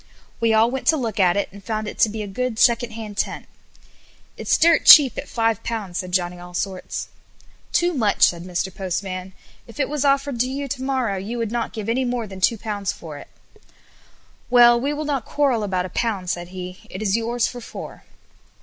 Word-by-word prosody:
We 230 -1 +2
all 220 +2 +4
went 265 0 -4
to 315 - +5
look 225 -6 -3
at 180 -1 +4
it, 200 - 0
and 200 0 -13
found 215 +1 -3
it - - -7
to 220 - +5
be 215 0 -5
a - - -6
good 240 +3 -3
second 235 +1 +3
hand 215 -2 -8
tent. - - -2 0.9
"It's - - +1
dirt 330 -1 +4
cheap 280 -4 +9
at - - -6
Ł5," 225 -4 -2
said 180 0 -3
Johnny 180 -1 0
Allsorts. 180 +2 -5 0.6
"Too 350 0 +2
much," 220 -8 +1
said 170 -1 +3
Mr. 180 +1 -3
Postman. 185 0 -4 0.3
"If 230 +5 -13
it 280 - +1
was 295 -1 -1
offered 275 -2 +1
to 250 +2 +1
you 280 +1 -4
to 265 0 -4
morrow 260 -7 -1
you 220 +6 -5
would 230 -2 -2
not 235 -1 -2
give 215 -2 -6
any 245 +3 +1
more 245 -2 -2
than 190 -2 -10
Ł2 205 -1 0
for 160 -7 -9
it." - - -12 1.2
"Well, 240 -1 +6
we 280 +3 0
will 300 +1 -3
not 280 -5 -1
quarrel 270 -5 +1
about 185 -3 -1
a - - -6
pound," 195 -4 -2
said 175 0 -4
he. 180 0 -8
"It 190 +4 -6
is 200 -1 +1
yours 230 +1 0
for 245 - -5
four." - - -9
220 Hz, 205 wpm, -22 LUFS, 190-250 Hz, 1.2 s, cheap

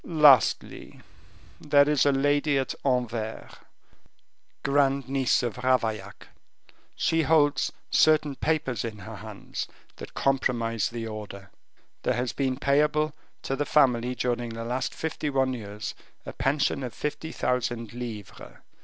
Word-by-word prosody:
"Lastly, 150 - +3 0.6
there 145 -1 +4
is 150 -1 +3
a - - +5
lady 145 +1 +2
at 135 -1 -1
Anvers, 120 -4 -1 1.1
grand 140 -1 +2
niece 135 -2 +2
of 120 -1 -3
Ravaillac; 110 -6 -1 0.7
she 165 0 +1
holds 145 -3 +3 0.2
certain 155 -2 +4
papers 135 -7 -1
in 110 -2 -5
her 105 +2 -9
hands 105 0 -6 0.3
that - - -10
compromise 115 -5 0
the 115 -1 -5
order. 105 -3 -8 0.5
There - - 0
has 120 0 -2
been 130 -2 -1
payable 150 +2 +2 0.3
to 135 - -1
the 145 - 0
family 125 -4 +2
during 120 -1 -1
the 115 0 -6
last 125 +2 -2
fifty 160 -1 -3
one 135 -2 +1
years 105 -3 -6 0.3
a - - -6
pension 140 0 0
of 125 -4 -5
fifty 160 +2 -4
thousand 120 -3 -2
livres. 115 -5 -8
130 Hz, 130 wpm, -27 LUFS, 115-145 Hz, 1.1 s, a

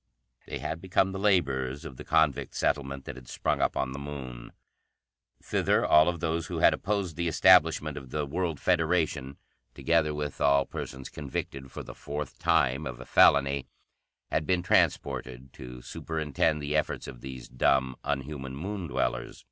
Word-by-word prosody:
They - - -4
had 80 +1 -4
become 95 +1 +1
the 95 - -5
laborers 70 -9 +1
of 65 - -8
the - - -8
convict 80 -4 +1
settlement 70 -1 -1
that 70 - -7
had 65 -2 -12
sprung - - -1
up - - +1
on 65 -1 -1
the 70 - -6
Moon. 65 -4 -7 0.9
Thither - - +1
all 80 +3 +6
those 80 0 -2
who - - -4
had - - +5
opposed 100 -6 -2
the 85 0 0
establishment 80 -4 +4
of 65 -3 -8
the 75 +2 -2
World 80 0 -2
Federation, 80 -5 +1 0.4
together 80 -2 +2
with 75 -1 -4
all 70 -1 +4
persons 65 0 -7
convicted 70 -2 -6
for - - -7
the - - -9
fourth 75 -1 -6
time 70 +5 +2
of 65 -1 -7
a 65 - -9
felony, 70 -1 +4 0.6
had 80 - 0
been 90 -1 +2
transported, 65 -5 0
to 60 -1 -10
superintend 80 -1 -1
the 75 +1 -1
efforts 75 - -1
of - - -9
these 65 -2 -8
dumb, 65 +1 +1
unhuman 70 -1 -3
Moon 95 +4 -4
dwellers. 65 -2 -2
70 Hz, 165 wpm, -28 LUFS, 65-80 Hz, 0.9 s, all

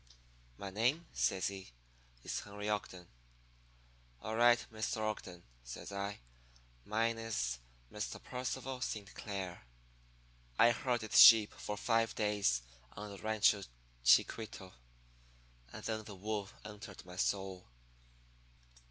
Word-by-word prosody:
"'My 100 -1 -6
name,' 125 - +1
says 95 0 +1
he, 95 -1 -8 0.5
'is - - -2
Henry 105 0 -7
Ogden.' 95 -4 -3 1.2
"'All 110 - -3
right, 120 +1 +5
Mr. 110 0 -2
Ogden,' 105 -5 -4 0.2
says - - -8
I. 100 -4 -4 0.6
'Mine 115 +2 0
is 65 - -2 0.3
Mr. 105 -1 -4
Percival 130 0 -4
Saint 105 -5 -4
Clair.' 95 -4 -5 1.0
"I 120 - +7
herded 120 -2 -1
sheep 110 -3 +10
for 105 - -5
five 115 +1 +1
days 100 - +1 0.3
on 105 0 -7
the 100 - -9
Rancho 110 -1 +3 0.4
Chiquito; 95 - +3 1.0
and - - -9
then 110 -1 -2
the 105 -1 -9
wool 100 0 -3 0.2
entered 105 -2 -9
my 90 0 -10
soul. 95 0 -1
105 Hz, 115 wpm, -35 LUFS, 95-115 Hz, 1.2 s, sheep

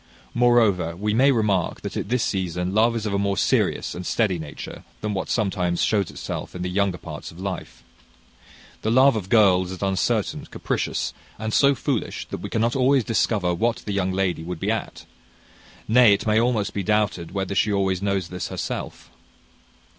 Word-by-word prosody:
Moreover, 115 -9 +3
we 105 +3 -1
may 135 +5 +5
remark 105 -8 0
that - - -6
at - - -3
this 125 -1 +1
season 90 -1 -2
love 115 +2 +3
is 110 -1 -3
of 105 - -2
a 100 - +1
more 100 -1 0
serious - - +1
and 90 - -6
steady 95 -2 0
nature 75 -2 -8 0.2
than 105 -1 -2
what 95 - -3
sometimes 90 -5 0
shows 100 -4 +1
itself - - -6
in 90 - -4
the 90 - -3
younger 100 -1 +1
parts 75 -4 -8
of 85 - -13
life. 95 -1 -6 1.0
The 110 - -1
love 130 +2 +5
of 100 -4 -4
girls 95 -5 +4
is 95 +1 -6
uncertain, 95 -1 0
capricious, - - -2 0.2
and 110 0 -4
so 140 0 +5
foolish 130 -1 -3
that - - -4
we - - -5
cannot 115 +1 0
always 135 0 +3
discover 105 -5 +1
what 115 +7 -1
the 105 - -3
young 95 -1 0
lady 95 -3 0
would 85 0 -6
be - - 0
at; - - -4 0.8
nay, 115 -1 +6
it 100 - -1
may 110 0 +3
almost 115 -4 0
be 100 - -2
doubted 105 -4 0
whether 95 -1 -2
she 105 +2 +2
always 95 -2 0
knows 100 -3 -1
this 90 0 -4
herself. - - -5
100 Hz, 185 wpm, -23 LUFS, 90-110 Hz, 1.0 s, nay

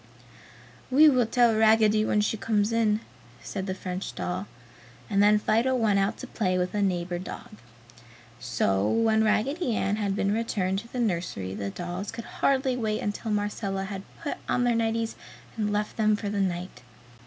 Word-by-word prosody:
"We 300 +4 +7
will 250 -5 +3
tell 240 -1 +4
Raggedy 215 -1 +4
when 210 - +2
she 210 - 0
comes 210 0 0
in!" 220 -2 +2 0.4
said 195 +7 -5
the 190 - -2
French 185 0 -5
doll, 185 +3 -3 0.6
and 200 0 +3
then 210 +1 +6
Fido 230 +5 +2
went 215 -5 +2
out 195 +3 0
to - - -7
play 185 -5 -1
with 180 0 -1
a 210 - 0
neighbor 175 -2 -1
dog. 210 +3 -9 0.8
So 100 -5 0
when 225 -1 +3
Raggedy 245 +5 +1
Ann 205 0 0
had 200 -2 -1
been 200 0 +1
returned 195 -4 -1
to 230 - -11
the 250 - -4
nursery 170 - -2
the 100 0 -4
dolls 175 - -5
could 230 - -7
hardly 265 -2 +1
wait 215 -3 -1
until 205 +2 -3
Marcella 205 -2 -2
had 195 0 -5 0.2
put 290 - -3
on 245 - +2
their 245 -1 +3
nighties 225 0 0 0.4
and 210 -2 -1
left 210 0 -2
them 215 -1 +3
for 210 -1 -4
the 200 -1 -1
night. 180 -1 -3
210 Hz, 175 wpm, -27 LUFS, 190-225 Hz, 0.8 s, We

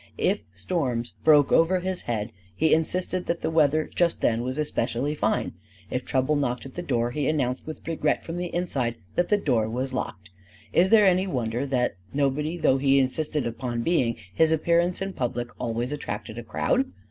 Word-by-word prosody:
If - - +1
storms 125 - -2
broke 150 -3 +5
over 175 +3 +4
his 185 0 -3
head, 110 -2 -3 0.2
he 160 0 +3
insisted 180 +3 0
that 170 0 -1
the 160 - -1
weather 155 -1 +3
just 175 -1 +2
then 115 0 +1
was 130 +3 -3
especially 135 -2 -1
fine; 110 -7 0 0.4
if 125 - -1
trouble 130 +3 +1
knocked 125 -4 -1
at 135 - -9
the 175 - -4
door, 120 -7 0
he 145 +1 -1
announced 130 -4 -1
with 155 - -8
regret 155 -2 0
from 165 +1 -5
the 175 0 -2
inside 140 -10 -1 0.2
that 175 - +1
the 210 - +4
door 120 - +1
was 130 +3 -3
locked. 100 -5 -5 0.4
Is 185 +2 +4
there 215 -1 +6
any 185 0 +3
wonder 125 -4 -2
that, 125 -6 0 0.2
nobody 145 +4 0
though 135 -5 +3
he 135 0 +4
insisted 145 +2 0
upon 120 0 -3
being, 125 -8 +2 0.2
his 160 +9 +3
appearance 170 +3 +2
in 195 0 -4
public 120 -3 -2
always 120 +2 -2
attracted 110 -5 -5
a - - -7
crowd? 255 - 0
140 Hz, 185 wpm, -26 LUFS, 120-165 Hz, 0.4 s, there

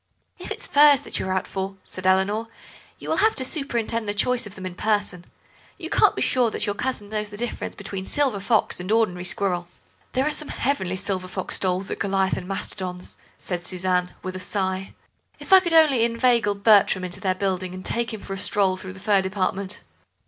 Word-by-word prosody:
"If - - -8
it's - - -2
furs 290 -2 +6
that - - -4
you're 190 - -2
out 190 0 0
for," 195 0 -4
said 185 0 -4
Eleanor, 200 +4 +2 0.5
"you - - -10
will - - 0
have 440 0 +3
to 260 - +1
superintend 235 -7 -1
the 205 - -1
choice 245 +2 +1
of 205 - -11
them 185 - -8
in 185 - -5
person. 205 -3 -1 0.5
You - - -7
can't - - +4
be - - 0
sure 250 -2 +2
that 215 - -1
your 205 - -1
cousin 210 -2 -2
knows 210 -1 -2
the 205 - -9
difference 240 +1 -4
between 195 -2 -6
silver 275 -8 +1
fox 205 0 +1
and 180 +3 -4
ordinary 185 -6 +1
squirrel." 180 -1 -1 0.5
"There 260 +1 +1
are 305 - +1
some 300 0 -1
heavenly 190 -9 -1
silver 185 -1 -2
fox 185 0 -2
stoles 185 0 -1
at - - -4
Goliath 195 -1 +1
and 180 - -6
Mastodon's," 185 -2 -4 0.2
said 175 -2 -4
Suzanne, 180 0 0
with 185 0 -5
a - - -4
sigh; 190 0 -2 0.4
"if - - -1
I 380 - +11
could 345 -3 -2
only 300 -7 +5
inveigle 235 -2 +2
Bertram 200 -2 +4
into 180 -1 -4
their 185 -2 0
building 185 -1 -2
and 185 - -9
take 235 0 -1
him 220 -2 -6
for 195 - -6
a 195 - -4
stroll 190 -2 +2
through 185 0 -8
the 190 - -12
fur 200 0 +3
department!" 190 +1 -2
200 Hz, 210 wpm, -24 LUFS, 185-230 Hz, 0.5 s, I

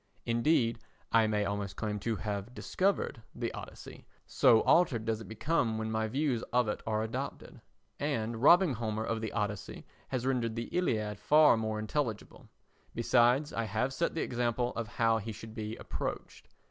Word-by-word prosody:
Indeed, 115 -1 +2 0.3
I 115 -1 +5
may 105 -1 0
almost 100 -1 -3
claim 105 -1 -3
to 115 +2 -1
have 105 +3 -4
discovered 190 - -1
the 120 -1 -3
Odyssey, - - -10 0.2
so 110 - +5
altered 130 -11 +3
does 110 -1 -1
it - - -9
become 115 0 0
when 110 0 -3
my 110 0 0
views 130 0 0
of 125 -1 +3
it 105 - -3
are 110 0 0
adopted. 110 - -6 0.4
And 115 -6 -2
robbing 170 +2 +6
Homer 110 -1 -2
of 115 0 -2
the 110 - -3
Odyssey 105 -2 -4 0.2
has 130 -2 -3
rendered 120 -4 0
the 115 0 -5
Iliad 110 - 0
far 150 +5 +6
more 110 -1 -2
intelligible; 110 0 -3 0.5
besides, 125 +5 +3
I 115 - -1
have 110 +6 -1
set 170 +4 -1
the 160 - 0
example 120 0 -1
of 115 -1 -3
how 115 0 +1
he 110 +2 -5
should 110 +1 -9
be 110 0 -5
approached. - - -6
115 Hz, 170 wpm, -31 LUFS, 110-125 Hz, 0.5 s, robbing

